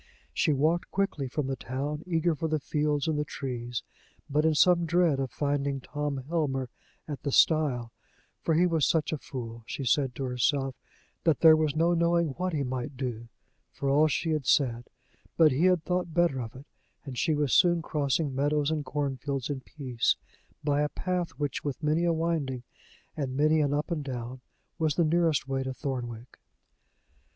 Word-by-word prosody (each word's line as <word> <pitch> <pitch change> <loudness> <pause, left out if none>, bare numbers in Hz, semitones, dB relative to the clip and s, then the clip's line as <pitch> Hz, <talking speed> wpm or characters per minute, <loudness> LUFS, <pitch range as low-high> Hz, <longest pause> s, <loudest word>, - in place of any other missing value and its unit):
She - - +2
walked 155 +5 +1
quickly 190 -8 -1
from 140 +3 -2
the 135 0 -2
town, 140 +5 -4
eager 170 -1 +1
for 160 +1 -2
the 155 0 +1
fields 150 0 0
and 155 -2 0
the - - +1
trees, 120 -4 -4 0.4
but 150 +2 +1
in 160 -1 +3
some 170 +1 +4
dread 170 -4 +3
of 135 -1 -1
finding 140 -1 -1
Tom 145 -1 -4
Helmer 135 -6 -1 0.4
at 145 -3 -5
the 140 - -2
stile; 135 -7 +3 0.5
for 165 - +1
he 175 +3 +4
was 165 -4 +2
such 160 -1 +1
a 155 - -2
fool, 120 -7 -7
she 135 - -4
said 130 0 +2
to 135 - -4
herself, 135 +2 0 0.5
that 160 -5 +2
there 160 -1 +9
was 155 -2 0
no 165 +2 +3
knowing 170 -1 +2
what 180 +7 -2
he 150 -4 -1
might 130 +1 -4
do, 120 -3 -4 0.4
for 135 - -2
all 150 +3 +5
she 160 +2 -1
had 150 -4 -1
said; 120 -4 +2 0.5
but 160 -2 +6
he 145 +7 +2
had 180 -3 +3
thought 180 -2 -2
better 170 -7 +2
of 115 0 -7
it, 135 +2 -11 0.4
and 135 -3 -6
she 155 +5 +1
was 145 -3 0
soon 175 -2 +4
crossing 145 -1 0
meadows 145 +2 +1
and 155 -2 -1
cornfields 140 -1 -2
in 140 - -3
peace, 130 -5 -1 0.5
by 145 0 +2
a 150 - +1
path 180 0 -2
which, 145 -3 -2
with 145 +1 -4
many 155 +3 +2
a 170 - +3
winding, 160 -6 -1 0.5
and 135 -3 -3
many 155 +2 +4
an 145 -2 +1
up 150 +4 -1
and 155 -3 -1
down, 125 -1 -6 0.4
was 155 -3 +1
the 170 - +3
nearest 160 -4 +2
way 135 0 -1
to 130 0 -4
Thornwick. 125 -4 -5
145 Hz, 185 wpm, -28 LUFS, 135-160 Hz, 0.5 s, there